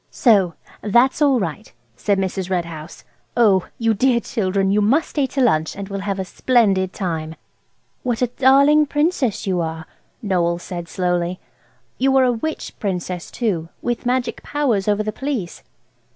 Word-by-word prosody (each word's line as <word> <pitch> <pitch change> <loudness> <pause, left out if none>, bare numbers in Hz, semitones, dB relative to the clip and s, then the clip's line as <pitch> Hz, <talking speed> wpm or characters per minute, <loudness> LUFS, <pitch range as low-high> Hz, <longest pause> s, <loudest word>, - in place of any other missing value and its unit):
"So 195 -8 +3 0.3
that's 240 +7 +3
all 275 -4 +4
right," 165 -8 -5 0.2
said 200 +10 0
Mrs. 190 -1 -2
Red 180 -2 0
House. 160 -1 -9 0.3
"Oh, 200 -6 +4
you 225 -1 +2
dear 245 +3 +2
children, 195 -4 -1
you 210 +1 +3
must 265 +10 +2
stay 285 -3 0
to 270 - -2
lunch, 160 -10 +2
and 200 0 -7
we'll 195 0 -4
have 195 0 -3
a 190 - -3
splendid 195 -4 +2
time." 160 -5 -4 0.7
"What 245 -1 -1
a - - +3
darling 280 +3 +5
Princess 295 - 0
you 185 -3 0
are!" 160 -1 -4 0.4
Noël 170 -3 +1
said 175 -1 -6
slowly. 180 0 -1 0.6
"You 270 +1 +3
are 265 - +5
a 250 -1 +3
witch 310 +7 -4
Princess, 180 -3 -3
too, 180 -9 -2
with 240 0 -2
magic 250 -1 -1
powers 250 -10 0
over 210 0 +2
the 215 - -2
Police." 260 -11 -4
205 Hz, 165 wpm, -20 LUFS, 180-250 Hz, 0.7 s, darling